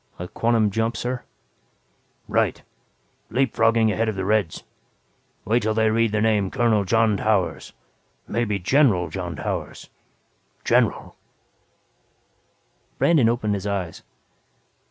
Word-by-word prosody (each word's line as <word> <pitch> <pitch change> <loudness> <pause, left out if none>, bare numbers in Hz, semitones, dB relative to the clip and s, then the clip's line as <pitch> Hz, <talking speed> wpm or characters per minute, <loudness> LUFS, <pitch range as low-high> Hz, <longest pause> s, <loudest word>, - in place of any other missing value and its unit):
"A 90 - -6
quantum 115 0 +1
jump 115 +2 -1
sir?" 125 0 -3 1.1
"Right. - - 0 0.7
Leap 130 -2 0
frogging 115 -1 +3
ahead 110 +1 0
of 110 - -3
the 95 -1 -3
Reds. 105 -5 0 0.8
Wait 115 +4 +2
till 110 0 -1
they 110 0 +2
read 115 0 +1
the 110 0 0
name 105 -3 +2
Colonel 110 -3 +1
John 110 +1 +2
Towers - - -1 0.5
maybe 110 -3 -1
General 100 - +2
John 90 -2 -5
Towers - - -5 0.7
General." - - +1 1.8
Brandon 145 -9 +3
opened 110 -3 -1
his 100 0 -3
eyes. 95 -5 -3
110 Hz, 115 wpm, -23 LUFS, 100-115 Hz, 1.8 s, frogging